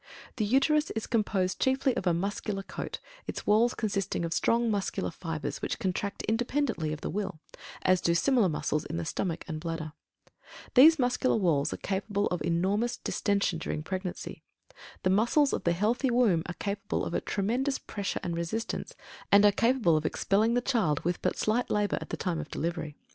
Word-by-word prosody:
The 215 - +1
Uterus 285 +7 +3
is 220 - -2
composed 200 -5 0
chiefly 265 -1 +2
of 190 - -2
a - - +5
muscular 195 +2 -2
coat, - - -6 0.3
its - - -5
walls 225 +4 +4
consisting 195 -5 -1
of 165 - -2
strong 230 +5 +2
muscular 200 -3 -1
fibres 165 -2 -5
which - - -2
contract 200 -1 -2
independently 230 - 0
of 155 - -5
the - - -3
will, 195 -5 -3 0.4
as 185 -1 +3
do 170 - +2
similar 235 0 +3
muscles 150 0 -1
in - - -5
the 85 - -3
stomach 170 - -3
and 160 -3 -4
bladder. 160 -2 -4 0.8
These 310 +5 +8
muscular 250 0 +2
walls 165 -9 +2
are - - -3
capable 200 +1 -1
of 180 -3 -2
enormous 195 +8 0
distention 200 -4 0
during 155 -1 -3
pregnancy. 185 +1 -5 0.6
The 185 - +3
muscles 240 +8 +3
of - - -2
the 170 - +3
healthy 225 +9 +1
womb 235 -9 +3
are 180 - -5
capable 200 0 -2
of - - -4
a - - 0
tremendous 245 +7 0
pressure 200 -2 -4
and 170 -1 -2
resistance, 170 +7 -3 0.4
and 200 +1 +7
are 205 - +7
capable 230 -7 +3
of 155 - -3
expelling 215 +4 +1
the 245 - +2
child 220 - +1
with 175 +1 -2
but - - 0
slight 230 +3 0
labor 210 -1 +1
at - - -8
the - - -3
time 175 -4 -2
of 160 - -6
delivery. 165 -2 -3
200 Hz, 185 wpm, -29 LUFS, 170-235 Hz, 0.8 s, These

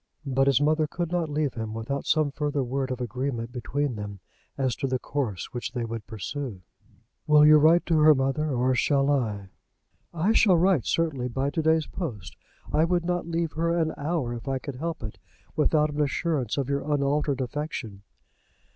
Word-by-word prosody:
But 135 0 +1
his 135 -3 +4
mother 155 +1 +2
could 170 +2 -4
not 175 -3 0
leave 150 -2 -1
him 110 -2 -5
without 135 +5 -4
some 155 -3 +2
further 145 -1 -1
word 130 +1 -2
of 130 -1 -3
agreement 125 0 -3
between 135 +2 -2
them 100 -1 -6 0.4
as 130 -3 0
to 135 - -1
the 130 0 0
course 125 -7 -3
which 120 0 -4
they 120 -2 -2
would 115 -2 -6
pursue. 110 -1 -5 0.6
"Will 150 0 +7
you 155 0 +8
write 160 +3 +5
to 165 -2 +2
her, 155 0 +7
mother, 135 +3 0
or 130 -1 +1
shall 140 +2 +2
I?" 105 -8 -1 0.6
"I 170 +5 +1
shall 195 -5 +5
write, 175 - +3
certainly, 150 -7 0
by 135 +3 -1
to 160 - -1
day's 160 0 +2
post. 125 - -6 0.4
I 155 - +4
would 175 0 +1
not 175 -1 -1
leave 165 -1 -1
her 170 +1 0
an 160 -2 0
hour, 145 -5 -2
if 120 +3 -8
I 135 -1 0
could 130 0 -7
help 165 -1 -4
it, 110 - -7 0.4
without 150 0 +2
an 150 +1 -1
assurance 145 -2 -1
of 135 -2 -1
your 140 0 0
unaltered 145 -1 +1
affection." 130 -6 -4
140 Hz, 190 wpm, -26 LUFS, 125-155 Hz, 0.6 s, you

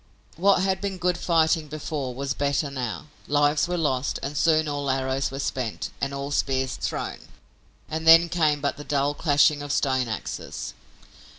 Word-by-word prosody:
What 190 +1 +3
had 190 0 0
been 200 -2 -3
good 180 0 +1
fighting 160 -2 +2
before 145 -3 -4
was 140 +1 -2
better 140 +1 -1
now. 125 -5 -4 0.2
Lives 145 +2 +2
were 180 0 -1
lost, 145 -5 0
and 140 +2 -4
soon 155 +1 +3
all 145 -1 -2
arrows 130 +1 0
were 135 - -7
spent 130 -4 -3
and 140 - -1
all 140 +1 -4
spears 130 -2 0
thrown, - - -4 0.6
and 160 +1 -4
then 165 +1 +9
came 155 -4 +1
but 140 - -1
the 145 - -7
dull 145 0 0
clashing 145 -1 +3
of 145 0 -5
stone 130 -3 +1
axes. 110 -2 -5
145 Hz, 170 wpm, -25 LUFS, 135-160 Hz, 0.6 s, then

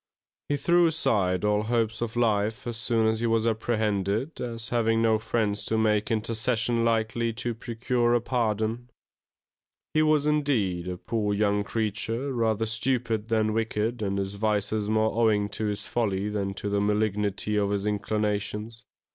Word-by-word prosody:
He 145 - +1
threw 175 +3 +4
aside 100 - +1
all 105 0 +2
hopes 115 0 -1
of 120 -1 -3
life 110 -2 +1
as 120 -1 -3
soon 115 0 +1
as 110 0 +1
he 120 - 0
was 115 0 +2
apprehended, 110 - -1
as 115 -1 -4
having 115 -1 +2
no 110 -1 +3
friends 110 -2 0
to 110 - 0
make 105 -1 +2
intercession 115 +1 0
likely 115 0 +1
to 120 +1 -3
procure 120 +1 0
a - - +4
pardon. 115 0 -1 1.0
He 155 - +3
was, 155 -1 +3
indeed, 120 - +1
a 90 -1 -4
poor 105 0 -1
young 105 0 +1
creature, 115 +5 -2
rather 110 -2 +1
stupid 115 -1 -1
than 110 -2 +1
wicked 115 +1 -1
and 100 -1 -1
his 95 0 -2
vices 105 0 0
more 110 0 +2
owing 110 -3 +2
to 105 +2 -3
his 105 -1 -2
folly 105 -4 -1
than 100 -2 -2
to 105 - -5
the 100 0 +1
malignity 105 0 0
of 100 -1 +1
his 100 0 -1
inclinations. 105 +2 -2
110 Hz, 160 wpm, -27 LUFS, 105-115 Hz, 1.0 s, threw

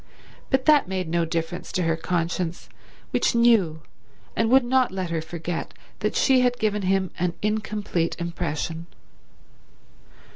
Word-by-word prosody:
But 265 -1 +1
that 300 -7 +5
made 185 -2 -2
no 170 0 +1
difference 165 +2 -3
to 185 - +1
her 165 -1 +1
conscience, 170 +1 -2 0.4
which - - +1
knew 205 -10 +3 0.5
and 225 0 +1
would 265 +1 +6
not 255 -1 +2
let 185 -2 -3
her 165 -1 -1
forget 170 +1 -5 0.2
that - - -1
she 265 -2 +4
had 245 -1 +2
given 210 -2 0
him 190 -1 +1
an 175 0 0
incomplete 210 -5 -1
impression. 165 -1 -3
180 Hz, 140 wpm, -24 LUFS, 165-220 Hz, 0.5 s, would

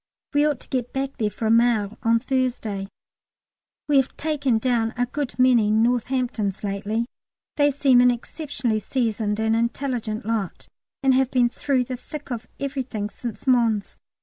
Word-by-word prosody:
We 290 +1 +4
ought 290 -4 -1
to - - -13
get 250 -2 -2
back 270 0 -3
there 215 -4 +1
for 220 - -5
a 220 - +3
mail 230 -3 +3
on 230 0 +3
Thursday. 240 -6 -1 1.0
We 290 -2 +4
have 265 -1 +1
taken 285 -6 +1
down 230 -1 0
a 245 - +2
good 275 +1 -4
many 250 -4 +4
Northamptons 230 -2 0
lately. 205 +3 -1 0.5
They 290 -1 +4
seem 270 -3 +4
an 250 - +6
exceptionally 245 -2 -2
seasoned 220 -2 -1
and 220 0 +2
intelligent 235 -1 -2
lot, 220 -5 -3 0.4
and 265 -1 +5
have 260 0 +3
been 250 -2 +3
through 260 0 0
the 250 0 -5
thick 290 +3 -9
of 235 -1 -4
everything 260 -7 -3
since 230 0 -7
Mons. 230 -5 +2
245 Hz, 160 wpm, -24 LUFS, 220-265 Hz, 1.0 s, an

